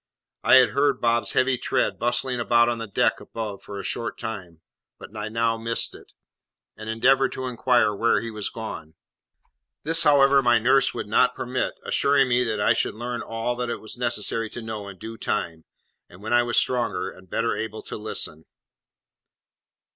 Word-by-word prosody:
I - - +6
had 130 -3 +7
heard 140 +3 +1
Bob's 115 0 +1
heavy 130 -1 +2
tread - - -1
bustling 120 +1 0
about 120 0 +3
on 120 -1 -2
the 115 - -5
deck 100 - +1
above 110 -3 -6
for 100 -1 -8
a - - -6
short 115 +5 -4
time, 90 -7 -7 0.4
but 105 - -13
I 105 0 -4
now 115 0 0
missed 115 +1 -2
it, - - -15 0.6
and 110 0 -8
endeavoured 130 +4 +3
to 130 - -5
inquire 120 -3 +2
where 115 +3 +2
he 115 0 -6
was 105 -2 -4
gone; 80 -8 -8 0.9
this, 165 +2 +5
however, 140 -1 +5
my 120 -2 +4
nurse 130 +4 +3
would - - -4
not 125 +4 +3
permit, 125 +1 -2
assuring 140 -2 +2
me 125 0 +3
that 110 -2 -2
I 105 - +4
should - - -1
learn 120 +1 -4
all 115 +2 -3
that 125 -1 -3
it - - -2
was 110 - -8
necessary 115 -2 -2
to 120 - -8
know 110 -2 -6
in 100 -1 -10
due 115 +2 -9
time, 85 -8 -3 0.4
and 95 +3 -15
when 110 - -2
I 120 - +5
was 120 0 -1
stronger 120 -7 0
and 95 -1 -17
better 115 +4 0
able 110 -1 -5
to - - -7
listen. 80 -7 -3
115 Hz, 185 wpm, -24 LUFS, 110-125 Hz, 0.9 s, had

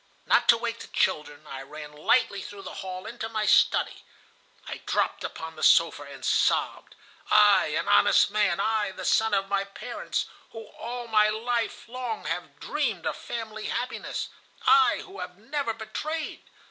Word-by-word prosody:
Not - - +3
to 235 - +8
wake 230 0 -3
the - - -9
children, 150 0 -1
I 135 -2 -7
ran 150 +2 -9
lightly 195 +6 +2
through 200 +1 -9
the 185 - -7
hall 185 0 -6
into 225 -1 -5
my 215 -1 -1
study. - - +3 0.6
I - - -5
dropped - - 0
upon 160 0 -6
the 155 - -10
sofa, 165 -3 +5
and 140 -1 -9
sobbed. - - +1 0.3
'I, - - +6
an - - -2
honest 70 - +5
man, 205 -4 +2
I, 215 0 +1
the - - -7
son 220 -1 +3
of 195 0 0
my 200 0 0
parents, 200 0 -4 0.3
who 225 -1 -8
all 240 +1 -6
my 215 -1 +4
life 230 +2 -2
long 245 -2 -5
have 175 +2 -4
dreamed 245 - -2
of - - -1
family 220 -2 -6
happiness, 250 - -3 0.4
I 445 -1 +5
who 385 -1 -11
have 180 - -7
never 270 +3 -2
betrayed! 305 +8 -5
215 Hz, 165 wpm, -27 LUFS, 180-235 Hz, 0.6 s, to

